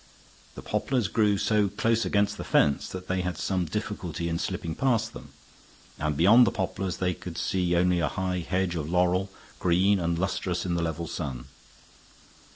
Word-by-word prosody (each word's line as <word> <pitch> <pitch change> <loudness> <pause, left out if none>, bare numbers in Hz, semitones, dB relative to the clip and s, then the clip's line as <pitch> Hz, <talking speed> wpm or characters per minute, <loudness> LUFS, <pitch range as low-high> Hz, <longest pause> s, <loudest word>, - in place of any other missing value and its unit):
The - - -9
poplars 125 -7 0
grew 105 +1 +2
so 105 0 +2
close 115 +3 0
against 100 0 +1
the - - -5
fence 70 -1 +2
that 95 0 -7
they 95 0 0
had 90 0 -3
some 95 -2 -1
difficulty 85 -2 -4
in 85 0 -1
slipping 80 - -3
past 115 - 0
them, - - -10 0.7
and 75 -1 -1
beyond 115 +9 +7
the - - +2
poplars 95 -1 -3
they 90 -1 0
could 85 -1 -8
see 90 0 0
only 90 0 +3
a 80 - +1
high 95 -1 -2
hedge 90 +1 -1
of 80 -3 -3
laurel, 90 +2 +2 0.3
green 95 +3 +3
and 85 -1 0
lustrous 90 0 -2
in 90 - -1
the 85 - 0
level 85 0 -2
sun. 70 -7 -5
90 Hz, 175 wpm, -27 LUFS, 85-100 Hz, 0.7 s, beyond